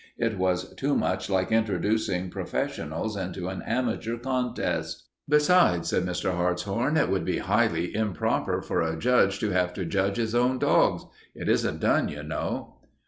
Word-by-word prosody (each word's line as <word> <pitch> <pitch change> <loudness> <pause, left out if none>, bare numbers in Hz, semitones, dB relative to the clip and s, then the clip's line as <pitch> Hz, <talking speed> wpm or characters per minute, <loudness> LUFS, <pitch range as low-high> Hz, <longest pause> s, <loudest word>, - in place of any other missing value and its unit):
It 115 -2 0
was 90 0 0
too 140 +1 0
much 95 +1 -1
like 95 +2 0
introducing 110 -4 0
professionals 85 +8 -3
into 95 -1 -4
an 95 - -5
amateur 120 -1 -2
contest. 125 0 -2 0.2
"Besides," 150 - +4
said 90 - 0
Mr. 90 +1 -1
Hartshorn, 100 - 0
"it 150 - +3
would 95 -3 0
be - - -1
highly 85 - +1
improper 105 -4 0
for - - -1
a 80 -1 -1
judge 105 -2 +3
to 105 - 0
have 90 -1 +1
to 95 - -3
judge 100 +3 0
his 115 -1 -1
own 125 +2 +2
dogs. - - +3 0.3
It - - -6
isn't - - +1
done, - - +2
you - - -7
know." - - -4
100 Hz, 160 wpm, -26 LUFS, 90-120 Hz, 0.3 s, Besides